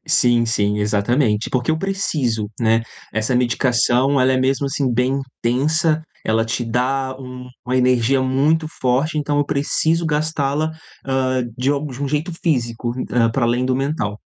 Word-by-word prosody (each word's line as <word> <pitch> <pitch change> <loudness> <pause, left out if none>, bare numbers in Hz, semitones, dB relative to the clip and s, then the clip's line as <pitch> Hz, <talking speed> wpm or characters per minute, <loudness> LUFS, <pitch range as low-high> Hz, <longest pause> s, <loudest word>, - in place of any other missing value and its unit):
Sim, 120 -6 +3
sim. 105 -2 0
Exatamente, 105 +2 +1
porque 125 +3 0
eu 160 - +1
preciso, 150 - -1
né. 115 0 +3 0.3
Essa 110 +4 0
medicação, 125 +2 +2
ela 130 +1 +4
é - - +2
mesmo, 135 +2 +1
assim, 135 -3 -1
bem 125 +3 +1 0.3
intensa, 155 +6 +1 0.2
ela 115 +1 +1
te 115 +1 -2
dá 130 +3 -1
um 125 -1 -9 0.2
uma 130 +1 0
energia 125 +1 +3
muito 145 +5 +2
forte, 135 +5 +1
então 145 0 0
eu 145 - +2
preciso 160 +4 0
gastá-la, 150 0 0 0.4
hã, 130 -1 0
de 130 +3 +1
alg 145 -1 -2
de 135 +3 -6
um 140 - -1
jeito 155 +5 -2
físico, 120 -6 -1 0.2
hã, 115 -2 +3
pra 120 +1 0
além 120 +2 +1
do 130 0 +1
mental. 135 -7 -2
130 Hz, 165 wpm, -20 LUFS, 120-145 Hz, 0.4 s, ela